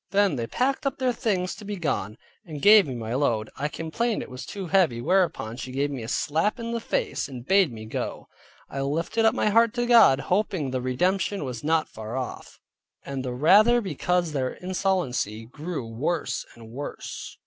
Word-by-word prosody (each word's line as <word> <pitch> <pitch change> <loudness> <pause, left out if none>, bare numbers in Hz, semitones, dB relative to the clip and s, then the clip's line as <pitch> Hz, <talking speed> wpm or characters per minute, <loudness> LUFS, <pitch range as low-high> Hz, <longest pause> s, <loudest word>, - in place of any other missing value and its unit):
Then 200 -5 +3
they 115 -2 -3
packed 270 - 0
up 275 - -2
their 255 -2 +1
things 185 -6 -1
to 215 - -11
be 205 0 -4
gone, 115 - -2 0.3
and 155 -7 -7
gave 205 +2 +7
me 130 - -4
my 115 -1 -4
load. 115 -5 0
I 145 - -2
complained 185 +10 -2
it - - -12
was 125 - -8
too 200 -2 -5
heavy, 170 -9 +2
whereupon 170 - +1
she 130 - -6
gave 140 +2 -1
me 135 -3 -5
a 110 - -6
slap 165 - 0
in 230 0 -4
the 235 - -1
face, 460 - -2
and 125 -3 -9
bade 190 -3 +4
me 110 -1 -8
go; 110 - -5 0.4
I 135 - -4
lifted 165 +11 0
up 220 - +4
my - - +2
heart 230 +2 +4
to 240 -1 0
God, 230 - +6
hoping 180 -7 0
the 130 -1 -1
redemption 180 +9 0
was 125 -1 -6
not 160 +1 +2
far 110 +3 -7
off; 130 -1 -6 0.5
and 135 -1 -4
the 130 - -3
rather 210 - +6
because 180 - -1
their 130 -3 -1
insolency 180 - -1
grew 150 +2 -5
worse 120 +10 -2
and 115 -1 -13
worse. 140 +4 -7
160 Hz, 195 wpm, -25 LUFS, 130-205 Hz, 0.5 s, gave